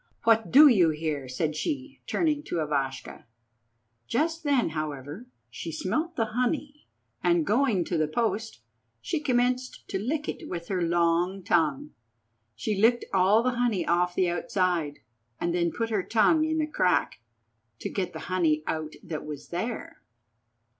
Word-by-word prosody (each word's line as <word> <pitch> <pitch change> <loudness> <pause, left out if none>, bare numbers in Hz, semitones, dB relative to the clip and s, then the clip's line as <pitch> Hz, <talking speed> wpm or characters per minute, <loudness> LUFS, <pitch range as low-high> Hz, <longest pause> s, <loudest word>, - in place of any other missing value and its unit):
What 225 -1 +3
do 295 +4 +9
you 190 - +5
here?" 150 -4 -3
said 150 +4 -2
she, 275 - -4
turning 305 -3 +1
to - - -4
Ivashka. 140 -4 -3 0.8
Just 325 +6 0
then, 280 - +2
however, 155 - -5 0.2
she - - -6
smelt 330 +2 -2
the 225 - +1
honey, 290 +4 -2 0.4
and, 340 -2 +3
going 225 - +2
to 170 - -1
the 155 - +2
post, 220 - -2 0.4
she 295 - -2
commenced 255 -2 0
to 190 - -2
lick 290 +8 -2
it - - -5
with 170 -1 -6
her 185 -2 0
long 175 +2 +1
tongue. 150 -4 +1 0.6
She 165 - -2
licked 240 +2 +4
all 195 +4 +4
the 255 - +2
honey 220 -8 +1
off 175 +1 +1
the 185 - +2
outside, 175 -3 -1 0.4
and 170 - -1
then 170 -1 +1
put 230 +4 -3
her 210 -3 +1
tongue 310 - +3
in 315 0 -1
the 310 - +1
crack, 185 - +1 0.6
to - - -5
get 190 -3 -3
the - - -8
honey 160 -4 +1
out 155 -1 -3
that 165 -5 -5
was 150 -2 -8
there. 220 +7 -5
190 Hz, 155 wpm, -27 LUFS, 165-250 Hz, 0.8 s, do